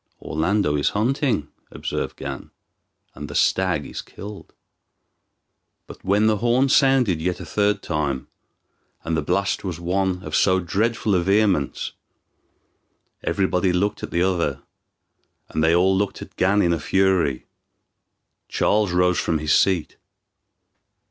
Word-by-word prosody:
"Orlando 80 0 0
is 70 - +2
hunting," 120 - 0 0.2
observed - - -4
Gan, 70 -1 -7 0.6
"and 75 +2 -8
the - - -7
stag 90 -6 +1
is - - -6
killed." 105 0 -10 1.3
But - - -13
when 100 +3 +2
the 110 -1 +3
horn 120 +4 +2
sounded 130 - +3
yet 90 +1 -1
a 90 - -7
third 105 +5 0
time, 70 -4 -2 0.8
and 85 - -1
the 80 - 0
blast 100 +2 -1
was 90 -4 -4
one 90 +1 -1
of 80 - -4
so 95 -1 +3
dreadful 105 +4 0
a 90 - +3
vehemence, 95 - +1 1.3
everybody 95 -1 +1
looked 95 +4 0
at - - -5
the 85 - +1
other, 85 -7 -1 0.9
and 80 - -1
then 80 - +4
they 85 - +4
all 95 +2 +3
looked 100 +1 -2
at - - -15
Gan 100 +2 +2
in 85 - +2
a 85 - -1
fury. 90 -5 +1 1.0
Charles 105 -3 +1
rose 90 0 +2
from 80 - 0
his 75 -1 0
seat. 90 -5 +2
95 Hz, 140 wpm, -22 LUFS, 80-105 Hz, 1.3 s, then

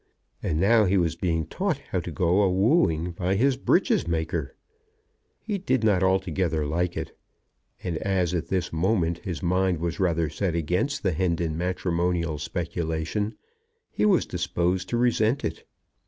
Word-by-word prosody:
And 80 -2 -1
now 110 +4 +5
he 95 +1 +2
was 85 -2 +1
being 80 -2 -1
taught - - -1
how - - +1
to - - -6
go 90 +3 +2
a 100 - +3
wooing 95 - +2
by 90 +3 -1
his 130 +6 +3
breeches 130 - +2
maker! 80 -3 -2 0.8
He 205 -3 -3
did 130 - 0
not 100 -4 +3
altogether 95 -4 +1
like 85 +4 -1
it, - - -5 0.7
and, 85 -3 -2
as 95 -3 0
at 85 -2 -2
this 90 -3 -2
moment 85 -1 +1
his 90 -9 -5
mind 90 0 +2
was 85 +1 -3
rather 85 -4 +1
set 85 +3 -2
against 90 - -1
the 95 - +2
Hendon 85 -1 0
matrimonial 85 -2 -1
speculation, 85 +5 -3 0.6
he - - -1
was 190 -4 +3
disposed 90 +1 -1
to 120 - 0
resent 120 +1 +2
it. 80 0 -5
90 Hz, 155 wpm, -26 LUFS, 85-95 Hz, 0.8 s, now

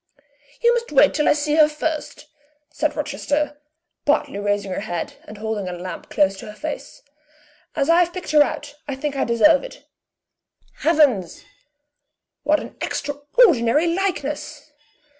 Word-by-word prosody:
"You 475 0 +5
must 475 -5 -2
wait 290 0 +5
till 300 - +2
I - - +6
see 300 +1 0
her 305 -1 +7
first," 310 0 -4 0.5
said - - -1
Rochester, 295 0 -2 0.4
partly 285 -8 +1
raising 205 -1 -1
her - - -2
head, 175 -5 -4
and 210 - -10
holding 215 -3 -3
a - - -5
lamp 175 0 -7
close 195 0 +2
to - - -9
her 210 - -9
face, 305 +4 -6 0.7
"as 275 - +1
I 335 +1 +5
have 350 -1 +2
picked 360 -2 -6
her 300 -1 +6
out, 290 0 -1
I 280 - -3
think 280 +1 -3
I 275 - 0
deserve 235 +2 +4
it. - - -11 0.9
Heavens! 280 - +2 1.0
what 305 +1 +2
an - - -10
extraordinary 290 - +2
likeness!" 300 -5 -3
290 Hz, 150 wpm, -22 LUFS, 215-310 Hz, 1.0 s, her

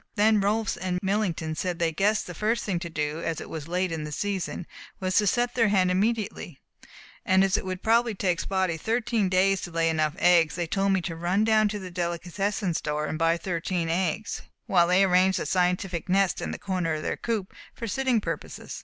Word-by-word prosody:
Then 215 0 +4
Rolfs 210 +2 0
and 185 -1 -2
Millington 190 -5 -1
said 175 +2 -2
they 165 -1 +1
guessed 200 +6 +1
the 180 - -7
first 220 +6 0
thing 185 -4 -1
to 170 0 -6
do, 150 0 -3
as 165 -2 -2
it - - -9
was 155 -3 -5
so - - -13
late 180 0 0
in 160 -2 -3
the 150 - -6
season, 190 +1 -3 0.3
was 185 0 -1
to 210 - +4
set 240 +4 +1
their 230 -3 +3
hen 190 -3 +3
immediately, 200 - -1 0.6
and 190 +1 +4
as 195 -1 +2
it - - 0
would 185 0 -5
probably 230 0 +3
take 180 -2 0
Spotty 190 -4 0
thirteen 225 +1 0
days 190 +1 +3
to - - -5
lay 165 -1 +1
enough 155 -1 0
eggs, 170 -3 +4
they 175 -1 -1
told 195 +4 0
me 190 - +1
to 170 -1 -4
run 175 +5 +1
down 220 -1 +4
to 210 - -3
the 185 -2 -8
delicatessen 175 +3 -2
store 150 -1 -2
and 155 - -4
buy 165 0 +3
thirteen 170 -1 -2
eggs, 180 +4 -1 0.2
while 175 -3 +4
they 180 +2 +4
arranged 185 0 +3
a - - -3
scientific 180 -1 0
nest 195 0 +2
in - - -3
the - - -4
corner 180 -5 -1
of 155 - -5
their - - -1
coop, 220 -5 -3 0.2
for 230 - -5
sitting 255 +1 +1
purposes. - - -6
185 Hz, 215 wpm, -26 LUFS, 170-205 Hz, 0.6 s, Then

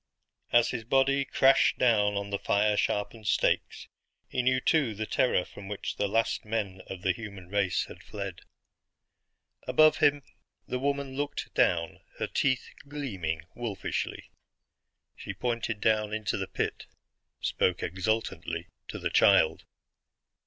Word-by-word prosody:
As 120 0 +5
his 120 -3 -3
body 135 +3 +3
crashed 135 +1 +4
down 105 -4 +3
on 100 0 -4
the 100 - -1
fire 105 +1 +2
sharpened 105 +1 -1
stakes, - - +1 0.4
he 125 - -1
knew 130 +1 +2
too 135 -5 +2
the 110 +2 -3
terror 110 -5 +2
from 100 - -11
which 105 0 -4
the 105 - +1
last 115 +3 0
men 105 -4 -3
of 95 -2 -8
the 95 - +3
human 100 -3 -8
race 100 -2 +1
had - - -12
fled. 100 -4 -6 1.3
Above 155 +4 +5
him 145 -1 +3 0.4
the 125 - -2
woman 140 0 -1
looked 145 +1 -4
down, 85 -2 +1 0.2
her - - -1
teeth 130 -2 0 0.2
gleaming 95 - -3
wolfishly. 115 -5 -4 0.8
She - - -7
pointed 115 -3 -2
down 105 0 +1
into 110 -1 -2
the 95 -1 -3
pit; - - -3 0.5
spoke 90 -1 0
exultantly 110 +6 -2 0.2
to - - -6
the - - -2
child. 80 - +4
110 Hz, 140 wpm, -29 LUFS, 100-130 Hz, 1.3 s, As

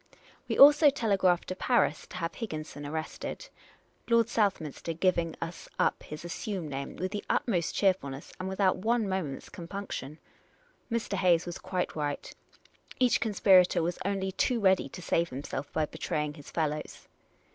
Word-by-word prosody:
We - - -1
also 295 +2 +9
telegraphed 195 -8 +2
to 185 - -3
Paris 240 +5 +1
to 185 - -8
have 165 -1 -3
Higginson 155 -8 -6
arrested, 160 - -5 0.6
Lord 230 -1 +5
vSouthminster 170 - -1
giving 170 -3 +1
us 165 +1 -6
up - - +1
his 150 +3 -8
assumed 175 -2 -4
name 140 0 -5
with 185 +2 -3
the 205 - -4
utmost 175 -8 0
cheerfulness, 155 -9 0
and 185 +1 -3
without 190 -1 +2
one 225 +3 +1
moment's 185 -8 -3
compunction. 170 -5 -6 0.7
Mr. 230 -3 -1
Hayes 180 -2 +3
was 175 -1 -6
quite 185 -1 -3
right: 145 -2 -3 0.7
each 250 -2 +4
conspirator 190 -5 +4
was 175 +1 -2
only 190 0 -1
too 235 +5 +1
ready 190 -7 +3
to 180 - -9
save 170 -1 +1
himself 140 +2 -5
by 155 - +1
betraying 150 0 -3
his 145 -2 -12
fellows. 155 -2 -3
180 Hz, 150 wpm, -29 LUFS, 155-200 Hz, 0.7 s, also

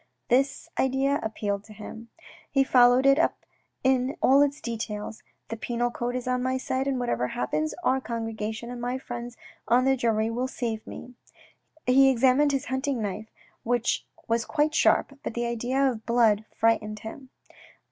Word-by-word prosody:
This 275 +5 +1
idea 270 +2 +2
appealed 205 -2 -3
to 215 - -13
him. 220 +2 -10 0.4
He 275 -1 +3
followed 250 0 +5
it 275 +2 +5
up - - 0 0.4
in 260 +1 +1
all 275 +2 +5
its 285 0 +1
details. 220 -2 -5
" - - -49
The 225 - -3
penal 240 +1 -1
code 240 +1 -3
is 255 0 -4
on 250 0 0
my 260 +1 0
side, 260 +1 -2
and 265 -2 0
whatever 240 - -1
happens 150 +6 -2
our 265 -3 +2
congregation 225 0 -4
and 245 -1 -7
my 245 +2 -2
friends 240 -2 -7 0.3
on 250 +2 +4
the 270 0 +4
jury 225 -2 0
will 250 +3 -1
save 230 -4 -4
me." 250 - -9 0.7
He 270 +2 +6
examined 265 +3 +4
his 275 0 -1
hunting 265 0 -1
knife 215 +1 -4 0.3
which 240 0 0 0.2
was 230 0 +1
quite 300 +2 0
sharp, 280 -2 +2
but - - -5
the 240 0 -1
idea 235 +2 -2
of 220 -2 -8
blood 225 -3 +3
frightened 215 -2 0
him. 255 +4 -9
245 Hz, 170 wpm, -26 LUFS, 225-265 Hz, 0.7 s, He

